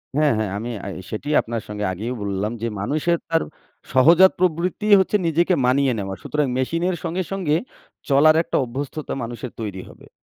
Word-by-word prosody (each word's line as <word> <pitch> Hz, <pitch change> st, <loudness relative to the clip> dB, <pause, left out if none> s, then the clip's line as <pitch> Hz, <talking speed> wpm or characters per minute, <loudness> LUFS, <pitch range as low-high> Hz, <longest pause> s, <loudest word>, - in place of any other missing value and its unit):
হ্যাঁ, 150 Hz, -1 st, +3 dB
হ্যাঁ, 110 Hz, -3 st, -1 dB
আমি 115 Hz, +3 st, -4 dB, 0.2 s
আ -, -, -4 dB, 0.2 s
সেটিই 145 Hz, +8 st, -2 dB
আপনার 115 Hz, -1 st, -4 dB
সঙ্গে 105 Hz, 0 st, -4 dB
আগেই 110 Hz, +7 st, -4 dB
বললাম, 100 Hz, +2 st, -2 dB
যে 115 Hz, -, -1 dB
মানুষের 155 Hz, +9 st, 0 dB
তার 165 Hz, 0 st, +2 dB, 0.5 s
সহজাত 170 Hz, +8 st, +7 dB
প্রবৃত্তিই 185 Hz, +4 st, +2 dB
হচ্ছে 190 Hz, +2 st, +1 dB
নিজেকে 170 Hz, +3 st, +2 dB
মানিয়ে 135 Hz, +1 st, +3 dB
নেওয়া। 95 Hz, -1 st, -4 dB
সুতরাং 150 Hz, -2 st, 0 dB
মেশিন 165 Hz, +6 st, -1 dB
এর 180 Hz, -, -1 dB
সঙ্গে, 175 Hz, +3 st, -2 dB
সঙ্গে 175 Hz, -6 st, 0 dB, 0.5 s
চলার 155 Hz, +3 st, +6 dB
একটা -, -, -1 dB
অভ্যস্ততা 140 Hz, +5 st, -5 dB
মানুষের 120 Hz, +1 st, -6 dB
তৈরি 95 Hz, -4 st, -5 dB
হবে। -, -, -16 dB
145 Hz, 170 wpm, -22 LUFS, 115-165 Hz, 0.5 s, সহজাত